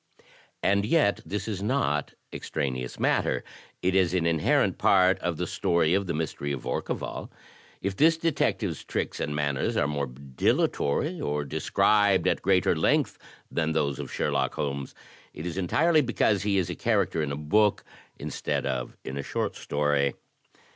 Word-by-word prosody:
t -, -, -27 dB, 0.4 s
11 100 Hz, +1 st, +3 dB
And 100 Hz, -, -1 dB
yet 145 Hz, -8 st, +3 dB
this 105 Hz, +1 st, -3 dB
is 100 Hz, -3 st, -3 dB
not 105 Hz, -, 0 dB, 0.2 s
extraneous 65 Hz, -5 st, -3 dB
matter, -, -, +1 dB, 0.4 s
it 90 Hz, +1 st, +2 dB
is 95 Hz, -1 st, +3 dB
an 85 Hz, -2 st, +1 dB
inherent 80 Hz, -2 st, +2 dB
part 95 Hz, -1 st, +4 dB
of 90 Hz, -3 st, -2 dB
the -, -, -1 dB
story 85 Hz, -1 st, +1 dB
of 100 Hz, 0 st, +1 dB
"The 85 Hz, -, -1 dB
Mystery 75 Hz, -2 st, -3 dB
of 70 Hz, -, -4 dB
Orcival.'' 65 Hz, -, -4 dB, 0.5 s
If 95 Hz, 0 st, -2 dB
this 160 Hz, +2 st, +5 dB
detective's 125 Hz, -, 0 dB
tricks -, -, -3 dB
and 75 Hz, -, -2 dB
manners 70 Hz, -2 st, 0 dB
are 70 Hz, -, +2 dB
more 70 Hz, -1 st, -2 dB
dilatory, 70 Hz, -, 0 dB
or 75 Hz, 0 st, -1 dB
described 100 Hz, +6 st, +2 dB
at -, -, +1 dB
greater 95 Hz, -1 st, +3 dB
length -, -, +1 dB, 0.3 s
than 80 Hz, -1 st, 0 dB
those 70 Hz, -3 st, 0 dB
of 70 Hz, -, -6 dB
Sherlock -, -, 0 dB
Holmes, 70 Hz, -1 st, -3 dB, 0.4 s
it 75 Hz, -, -6 dB
is 85 Hz, -2 st, -3 dB
entirely 155 Hz, -, +3 dB
because 115 Hz, -5 st, +1 dB
he 100 Hz, -1 st, +1 dB
is 90 Hz, -2 st, 0 dB
a -, -, -4 dB
character 80 Hz, -, +1 dB
in 75 Hz, -2 st, -2 dB
a -, -, -2 dB
book 105 Hz, +8 st, +2 dB, 0.3 s
instead -, -, -3 dB
of 65 Hz, -2 st, -3 dB
in 65 Hz, -, -5 dB
a -, -, 0 dB
short -, -, -2 dB
story. 70 Hz, -1 st, 0 dB
85 Hz, 170 wpm, -27 LUFS, 70-100 Hz, 0.5 s, this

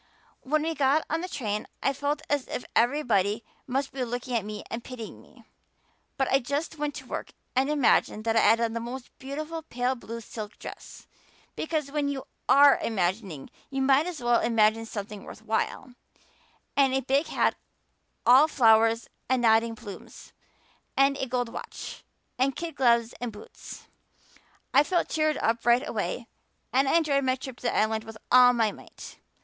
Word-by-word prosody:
When 305 Hz, +3 st, 0 dB
we 325 Hz, +1 st, -1 dB
got 285 Hz, +1 st, +2 dB
on 325 Hz, +1 st, 0 dB
the 365 Hz, -, -4 dB
train 210 Hz, -8 st, -3 dB, 0.2 s
I 275 Hz, -, +2 dB
felt 290 Hz, +2 st, -2 dB
as 285 Hz, -2 st, 0 dB
if -, -, -5 dB
everybody 230 Hz, -4 st, +2 dB, 0.2 s
must 270 Hz, +2 st, -1 dB
be 265 Hz, -1 st, -3 dB
looking 245 Hz, +1 st, -3 dB
at 225 Hz, -, +1 dB
me 210 Hz, 0 st, -6 dB
and 230 Hz, +1 st, -4 dB
pitying 245 Hz, -4 st, -8 dB
me. -, -, -20 dB, 0.7 s
But 270 Hz, -2 st, +1 dB
I 270 Hz, -, +5 dB
just 285 Hz, +5 st, -3 dB
went 295 Hz, -1 st, -2 dB
to -, -, -8 dB
work -, -, -6 dB, 0.2 s
and 265 Hz, +2 st, +2 dB
imagined 270 Hz, -6 st, +2 dB
that 225 Hz, 0 st, 0 dB
I -, -, +6 dB
had 225 Hz, +1 st, +5 dB
on 230 Hz, -1 st, 0 dB
the 230 Hz, -, -2 dB
most 245 Hz, +2 st, -7 dB
beautiful 305 Hz, +4 st, -5 dB
pale 250 Hz, -4 st, -1 dB
blue 230 Hz, -2 st, -7 dB
silk 215 Hz, -1 st, -8 dB
dress -, -, -10 dB, 0.5 s
because 310 Hz, -3 st, -2 dB
when 290 Hz, -1 st, 0 dB
you 275 Hz, -2 st, -3 dB, 0.3 s
are 285 Hz, 0 st, +7 dB
imagining 185 Hz, -6 st, -2 dB, 0.2 s
you 270 Hz, -1 st, -1 dB
might 275 Hz, +4 st, +4 dB
as 325 Hz, -8 st, -6 dB
well 240 Hz, -1 st, +3 dB
imagine 225 Hz, -1 st, +2 dB
something 205 Hz, -2 st, -6 dB
worth 215 Hz, -, -11 dB
while 225 Hz, +3 st, -2 dB, 0.8 s
and 270 Hz, -2 st, +4 dB
a 265 Hz, -, +1 dB
big 275 Hz, +5 st, +1 dB
hat -, -, +1 dB, 0.7 s
all 265 Hz, +5 st, +7 dB
flowers 225 Hz, -4 st, +4 dB, 0.2 s
and 255 Hz, -2 st, +2 dB
nodding 225 Hz, 0 st, +4 dB
plumes, 210 Hz, -3 st, -11 dB, 0.6 s
and 275 Hz, 0 st, +4 dB
a 265 Hz, -, -2 dB
gold 245 Hz, -1 st, -1 dB
watch, -, -, -8 dB, 0.4 s
and 270 Hz, +1 st, +2 dB
kid 335 Hz, -1 st, -5 dB
gloves 235 Hz, -3 st, +3 dB
and 245 Hz, -2 st, -3 dB
boots. 210 Hz, 0 st, -11 dB, 0.9 s
I 275 Hz, -, +7 dB
felt 345 Hz, +3 st, 0 dB
cheered 310 Hz, -1 st, +1 dB
up 230 Hz, +1 st, 0 dB
right 240 Hz, +4 st, +3 dB
away -, -, -3 dB, 0.5 s
and 270 Hz, +1 st, +3 dB
I -, -, +3 dB
enjoyed 285 Hz, -4 st, +2 dB
my 255 Hz, -1 st, +2 dB
trip 260 Hz, -1 st, -8 dB
to -, -, -17 dB
the -, -, -1 dB
Island 220 Hz, 0 st, +1 dB
with 225 Hz, -1 st, -10 dB
all 250 Hz, 0 st, +8 dB
my 225 Hz, -3 st, +1 dB
might. -, -, -12 dB
250 Hz, 175 wpm, -27 LUFS, 225-280 Hz, 0.9 s, all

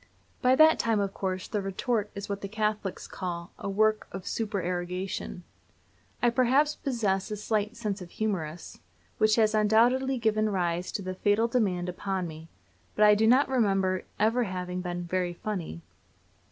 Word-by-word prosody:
By 255 Hz, 0 st, +5 dB
that 315 Hz, +2 st, +6 dB
time, 225 Hz, -2 st, +2 dB
of 200 Hz, -1 st, -1 dB
course, 185 Hz, -1 st, -3 dB
the 210 Hz, -, -2 dB
retort 205 Hz, +2 st, -1 dB
is 200 Hz, 0 st, -5 dB
what 200 Hz, -1 st, -4 dB
the 200 Hz, -, -4 dB
Catholics 210 Hz, -2 st, -2 dB
call 170 Hz, -2 st, -5 dB
"a 200 Hz, -, -4 dB
work 215 Hz, +2 st, +2 dB
of 190 Hz, -2 st, -7 dB
supererogation." 180 Hz, -3 st, -3 dB, 0.8 s
I 240 Hz, -, +5 dB
perhaps 265 Hz, +5 st, +3 dB
possess 210 Hz, -8 st, -1 dB
a 210 Hz, -, -4 dB
slight 210 Hz, 0 st, -1 dB
"sense 210 Hz, -4 st, -3 dB
of 180 Hz, -, -7 dB
the -, -, -22 dB
humorous," 175 Hz, -7 st, -3 dB, 0.4 s
which 215 Hz, 0 st, +4 dB
has 220 Hz, -2 st, +3 dB
undoubtedly 240 Hz, +5 st, +3 dB
given 215 Hz, -2 st, +1 dB
rise 175 Hz, -2 st, -1 dB
to 200 Hz, -, -3 dB
the 185 Hz, 0 st, -4 dB
fatal 205 Hz, +4 st, +2 dB
demand 195 Hz, -7 st, 0 dB
upon 185 Hz, 0 st, -3 dB
me, 160 Hz, 0 st, -10 dB, 0.5 s
but 210 Hz, -, +5 dB
I 210 Hz, -, +8 dB
do 220 Hz, +2 st, +3 dB
not 255 Hz, +5 st, +5 dB
remember 195 Hz, -7 st, +1 dB, 0.2 s
ever 230 Hz, +3 st, +2 dB
having 180 Hz, -1 st, -4 dB
been 175 Hz, -1 st, -4 dB
very 180 Hz, 0 st, -1 dB
funny. 175 Hz, -, -5 dB
205 Hz, 165 wpm, -28 LUFS, 185-220 Hz, 0.8 s, I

